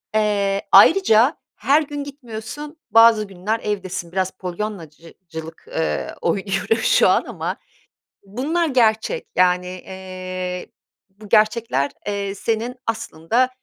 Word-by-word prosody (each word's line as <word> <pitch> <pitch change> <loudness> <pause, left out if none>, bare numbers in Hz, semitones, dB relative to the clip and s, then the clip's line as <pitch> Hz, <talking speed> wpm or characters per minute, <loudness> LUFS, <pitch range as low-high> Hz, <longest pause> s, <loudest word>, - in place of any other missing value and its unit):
Eee, 200 -2 +1
ayrıca 275 - +6 0.2
her 290 +3 +3
gün 290 -1 -5
gitmiyorsun, 280 +2 -8
bazı 225 0 +7
günler 195 +4 -3
evdesin 185 -4 -4
biraz 190 0 -1
Polyannacı 180 -4 -7 0.2
cılık, 160 0 -8
eee, 160 - -2
oynuyoruz 195 +5 0
şu - - +5
an - - +3
ama - - -4 0.7
bunlar 275 - -1
gerçek. 245 - +1
Yani, 180 0 +3
eee, 185 0 -6 0.4
bu 205 +2 -15
gerçekler, 215 - +2 0.2
eee, 200 -1 -2
senin 230 +4 -2
aslında 225 +2 0
210 Hz, 110 wpm, -21 LUFS, 185-230 Hz, 0.7 s, bazı